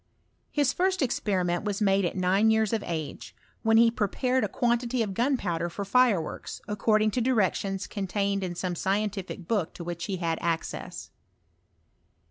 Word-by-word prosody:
:His 285 Hz, -2 st, +1 dB
first 375 Hz, -2 st, +1 dB
experiment 185 Hz, -8 st, 0 dB
was 205 Hz, -2 st, -2 dB
made 195 Hz, -2 st, +3 dB
at 175 Hz, -, -2 dB
nine 190 Hz, +4 st, +3 dB
years 220 Hz, -1 st, +2 dB
of 220 Hz, -, +1 dB
age, 160 Hz, -4 st, -5 dB, 0.3 s
when 225 Hz, 0 st, +4 dB
he 230 Hz, 0 st, +6 dB
prepared 250 Hz, +4 st, 0 dB
a -, -, +1 dB
quantity 240 Hz, +2 st, +1 dB
of 200 Hz, -3 st, -4 dB
gunpowder 190 Hz, -9 st, 0 dB
for 200 Hz, +4 st, -5 dB
fireworks, 205 Hz, -6 st, +1 dB
according 215 Hz, +1 st, +2 dB
to 245 Hz, -, 0 dB
directions 200 Hz, -5 st, +1 dB
contained 200 Hz, 0 st, -1 dB
in. 175 Hz, -1 st, -3 dB
some 180 Hz, +1 st, -2 dB
"Scientific 195 Hz, -1 st, -2 dB
book 205 Hz, -8 st, -1 dB
to 170 Hz, -, -7 dB
which 170 Hz, 0 st, -4 dB
he 195 Hz, -2 st, -3 dB
had 165 Hz, -2 st, -1 dB
access. 165 Hz, -1 st, -3 dB
200 Hz, 155 wpm, -27 LUFS, 180-230 Hz, 0.3 s, he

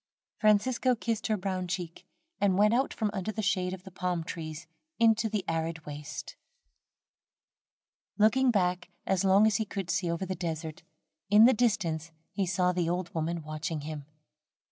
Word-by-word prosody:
Francisco 235 Hz, +4 st, +3 dB
kissed 230 Hz, -1 st, -2 dB
her 215 Hz, -1 st, +1 dB
brown 185 Hz, -1 st, -3 dB
cheek, 175 Hz, -2 st, -5 dB, 0.3 s
and 195 Hz, -2 st, +2 dB
went 210 Hz, +2 st, +5 dB
out 265 Hz, +3 st, +2 dB
from 215 Hz, -2 st, -1 dB
under 195 Hz, +1 st, -2 dB
the 220 Hz, 0 st, -4 dB
shade 180 Hz, -1 st, +1 dB
of 185 Hz, -1 st, -7 dB
the 190 Hz, -, -11 dB
palm 180 Hz, -2 st, -2 dB
trees 160 Hz, 0 st, -6 dB, 0.3 s
into 225 Hz, -1 st, +3 dB
the 205 Hz, -3 st, -2 dB
arid 165 Hz, 0 st, -2 dB
waste. 150 Hz, 0 st, -7 dB, 1.8 s
Looking 245 Hz, +5 st, +4 dB
back, 180 Hz, -5 st, +1 dB, 0.2 s
as 190 Hz, -1 st, +1 dB
long 195 Hz, +2 st, +5 dB
as 215 Hz, -2 st, +3 dB
he 220 Hz, -, 0 dB
could 195 Hz, -3 st, -4 dB
see 180 Hz, -3 st, 0 dB
over 170 Hz, +3 st, -2 dB
the 190 Hz, -, -3 dB
desert, 160 Hz, -3 st, -4 dB, 0.5 s
in 210 Hz, +2 st, +8 dB
the 255 Hz, -, +6 dB
distance 170 Hz, -9 st, 0 dB, 0.2 s
he 195 Hz, -3 st, -1 dB
saw 180 Hz, 0 st, +2 dB
the 175 Hz, -2 st, 0 dB
old 175 Hz, 0 st, -2 dB
woman 165 Hz, 0 st, -2 dB
watching 155 Hz, 0 st, -4 dB
him. 150 Hz, -1 st, -6 dB
185 Hz, 165 wpm, -29 LUFS, 165-210 Hz, 1.8 s, in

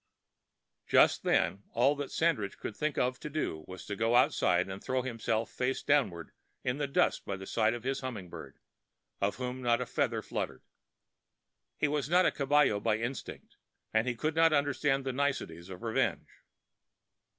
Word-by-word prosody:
Just -, -, +5 dB
then 95 Hz, +3 st, +1 dB
all 130 Hz, +5 st, +4 dB
that 145 Hz, -1 st, -4 dB
Sandridge 140 Hz, -, 0 dB
could 105 Hz, -, -6 dB
think 150 Hz, -1 st, -2 dB
of 125 Hz, +1 st, 0 dB
to -, -, -6 dB
do 140 Hz, -, -3 dB
was 95 Hz, 0 st, -9 dB
to 100 Hz, -, -4 dB
go 115 Hz, +3 st, +1 dB
outside 90 Hz, -7 st, +3 dB
and 95 Hz, 0 st, -7 dB
throw 130 Hz, 0 st, 0 dB
himself 115 Hz, -2 st, -2 dB
face 130 Hz, +1 st, -1 dB
downward 100 Hz, -, +1 dB, 0.3 s
in 125 Hz, +3 st, -1 dB
the 145 Hz, -, 0 dB
dust 140 Hz, -, +1 dB
by 100 Hz, -, -4 dB
the 95 Hz, -, -8 dB
side 110 Hz, +3 st, +1 dB
of 120 Hz, -, -8 dB
his 135 Hz, +1 st, -1 dB
humming 120 Hz, -9 st, -5 dB
bird, -, -, -10 dB, 0.6 s
of 100 Hz, +1 st, +1 dB
whom 125 Hz, 0 st, -4 dB
not 120 Hz, -1 st, +2 dB
a 125 Hz, -, -2 dB
feather 120 Hz, -4 st, -1 dB
fluttered. -, -, -4 dB, 1.1 s
He 150 Hz, -, +2 dB
was 145 Hz, -2 st, -1 dB
not 180 Hz, +2 st, +5 dB
a -, -, +4 dB
caballero 140 Hz, -6 st, +3 dB
by 105 Hz, +1 st, +1 dB
instinct, 120 Hz, +4 st, -6 dB, 0.4 s
and 110 Hz, +3 st, +2 dB
he 125 Hz, -, 0 dB
could 155 Hz, +7 st, -1 dB
not 165 Hz, 0 st, +4 dB
understand 140 Hz, -1 st, +1 dB
the 130 Hz, -, -1 dB
niceties 125 Hz, -11 st, -2 dB
of 95 Hz, +4 st, -9 dB
revenge. 115 Hz, -1 st, 0 dB
125 Hz, 175 wpm, -31 LUFS, 105-140 Hz, 1.1 s, Just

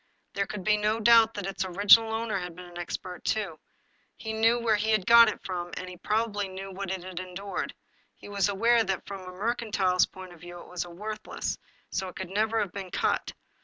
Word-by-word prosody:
There 200 Hz, 0 st, -1 dB
could 205 Hz, -3 st, -6 dB
be 210 Hz, +1 st, +3 dB
no 210 Hz, +2 st, +1 dB
doubt 225 Hz, 0 st, +6 dB
that 205 Hz, -2 st, -4 dB
its 195 Hz, 0 st, -2 dB
original 205 Hz, +4 st, +6 dB
owner 220 Hz, -3 st, -1 dB
had 180 Hz, -2 st, -6 dB
been 180 Hz, +1 st, -10 dB
an 175 Hz, 0 st, -10 dB
expert 180 Hz, +1 st, -6 dB
too. 195 Hz, -8 st, -1 dB, 0.6 s
He 220 Hz, -1 st, -5 dB
knew 225 Hz, +2 st, +3 dB
where 230 Hz, -2 st, +2 dB
he 215 Hz, +1 st, +3 dB
got 230 Hz, +3 st, +7 dB
it -, -, -6 dB
from, 175 Hz, -2 st, -3 dB
and 185 Hz, -, -5 dB
he 180 Hz, -, -8 dB
probably 210 Hz, +1 st, -1 dB
knew 190 Hz, +1 st, -7 dB
what 195 Hz, 0 st, -5 dB
it 190 Hz, -1 st, -3 dB
had 185 Hz, -1 st, -6 dB
endured. 185 Hz, +1 st, -5 dB, 0.4 s
He -, -, -13 dB
was 200 Hz, -1 st, +1 dB
aware 230 Hz, +4 st, +3 dB
that, 190 Hz, -3 st, -2 dB
from 195 Hz, -1 st, -7 dB
a 185 Hz, 0 st, -9 dB
mercantile 200 Hz, -2 st, -1 dB
point 185 Hz, -2 st, -10 dB
of 170 Hz, -, -17 dB
view, 175 Hz, 0 st, -9 dB
it -, -, -12 dB
was 180 Hz, -1 st, -4 dB
worthless; 215 Hz, +5 st, -5 dB, 0.3 s
it 190 Hz, -2 st, -3 dB
could 190 Hz, -1 st, -6 dB
never 220 Hz, +2 st, +1 dB
have 200 Hz, -3 st, -2 dB
been 195 Hz, -1 st, -6 dB
cut. -, -, 0 dB
195 Hz, 210 wpm, -28 LUFS, 185-220 Hz, 0.6 s, got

